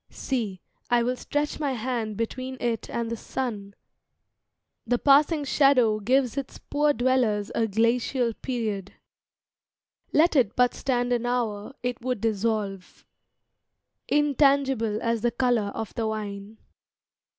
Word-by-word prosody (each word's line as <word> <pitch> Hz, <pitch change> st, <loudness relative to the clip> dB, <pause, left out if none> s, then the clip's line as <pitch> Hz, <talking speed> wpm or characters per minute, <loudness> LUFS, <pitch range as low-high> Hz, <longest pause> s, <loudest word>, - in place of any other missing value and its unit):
See, 220 Hz, -9 st, -3 dB, 0.3 s
I 240 Hz, -1 st, +3 dB
will 250 Hz, +2 st, 0 dB
stretch 295 Hz, +4 st, -2 dB
my 285 Hz, -3 st, 0 dB
hand 230 Hz, -3 st, -3 dB
Between 255 Hz, +3 st, -4 dB
it 230 Hz, -2 st, -2 dB
and 235 Hz, -1 st, -3 dB
the -, -, -1 dB
sun; 210 Hz, -5 st, -5 dB, 1.1 s
the 245 Hz, -, +1 dB
passing 290 Hz, +3 st, +4 dB
shadow 265 Hz, -6 st, +3 dB
Gives 255 Hz, +4 st, +1 dB
its 275 Hz, -, -4 dB
poor 295 Hz, +1 st, +1 dB
dwellers 245 Hz, -6 st, +1 dB
a 225 Hz, -, +1 dB
glacial 230 Hz, +3 st, +1 dB
period. 215 Hz, -7 st, -4 dB, 1.2 s
Let 325 Hz, +2 st, +4 dB
it 240 Hz, -6 st, +3 dB
but 245 Hz, 0 st, +3 dB
stand 245 Hz, -2 st, 0 dB
an 245 Hz, 0 st, -1 dB
hour, 235 Hz, -1 st, -2 dB
it 245 Hz, -1 st, -3 dB
would 250 Hz, -1 st, -2 dB
dissolve, 210 Hz, -3 st, -2 dB, 1.0 s
Intangible 275 Hz, -6 st, +2 dB
as 230 Hz, -1 st, 0 dB
the 240 Hz, -, +2 dB
color 235 Hz, -5 st, +1 dB
of 225 Hz, -2 st, -5 dB
the 225 Hz, -1 st, -2 dB
wine. 210 Hz, -1 st, -5 dB
240 Hz, 130 wpm, -26 LUFS, 220-260 Hz, 1.2 s, passing